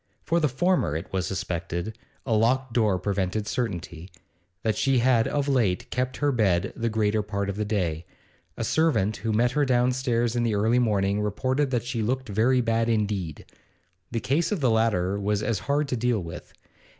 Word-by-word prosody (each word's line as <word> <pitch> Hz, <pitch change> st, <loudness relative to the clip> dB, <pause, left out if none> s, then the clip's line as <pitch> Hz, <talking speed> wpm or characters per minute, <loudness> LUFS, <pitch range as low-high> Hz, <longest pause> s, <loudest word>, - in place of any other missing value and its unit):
For 170 Hz, +1 st, +1 dB
the 150 Hz, -3 st, +2 dB
former, 170 Hz, -, +1 dB
it 80 Hz, -, -6 dB
was 95 Hz, -1 st, -1 dB
suspected 85 Hz, +2 st, -3 dB, 0.3 s
a 115 Hz, -, 0 dB
locked 120 Hz, +3 st, +2 dB
door 110 Hz, -5 st, +2 dB
prevented 100 Hz, +2 st, -1 dB
certainty 90 Hz, -6 st, -4 dB, 0.5 s
that 110 Hz, -2 st, +1 dB
she 135 Hz, +3 st, +2 dB
had 120 Hz, -2 st, +3 dB
of 145 Hz, -1 st, -1 dB
late 115 Hz, -10 st, +1 dB
kept 125 Hz, +1 st, -2 dB
her 145 Hz, 0 st, +1 dB
bed 100 Hz, -6 st, +1 dB
the 115 Hz, 0 st, -1 dB
greater 110 Hz, -1 st, +1 dB
part 100 Hz, -1 st, -3 dB
of -, -, -7 dB
the 105 Hz, +1 st, -2 dB
day; 90 Hz, -6 st, -2 dB, 0.5 s
a -, -, -2 dB
servant 110 Hz, -11 st, +1 dB
who 110 Hz, +3 st, -2 dB
met 120 Hz, +3 st, +2 dB
her 145 Hz, +2 st, +1 dB
downstairs 125 Hz, -2 st, +1 dB
in 120 Hz, -, +1 dB
the 115 Hz, -3 st, +1 dB
early 110 Hz, +4 st, +2 dB
morning 105 Hz, -3 st, +1 dB
reported 130 Hz, +7 st, 0 dB
that 120 Hz, -3 st, -1 dB
she 120 Hz, -2 st, -2 dB
'looked 130 Hz, +2 st, -2 dB
very 120 Hz, +5 st, +3 dB
bad 115 Hz, 0 st, +1 dB
indeed.' 100 Hz, -8 st, -1 dB, 0.6 s
The 115 Hz, -, -2 dB
case 150 Hz, -, 0 dB
of 205 Hz, -, 0 dB
the 130 Hz, -5 st, +2 dB
latter 100 Hz, -4 st, +1 dB
was 105 Hz, +1 st, 0 dB
as 110 Hz, -4 st, 0 dB
hard 145 Hz, +1 st, +2 dB
to 125 Hz, -, 0 dB
deal 120 Hz, -1 st, +1 dB
with. 85 Hz, -, -9 dB
110 Hz, 185 wpm, -26 LUFS, 100-125 Hz, 0.6 s, had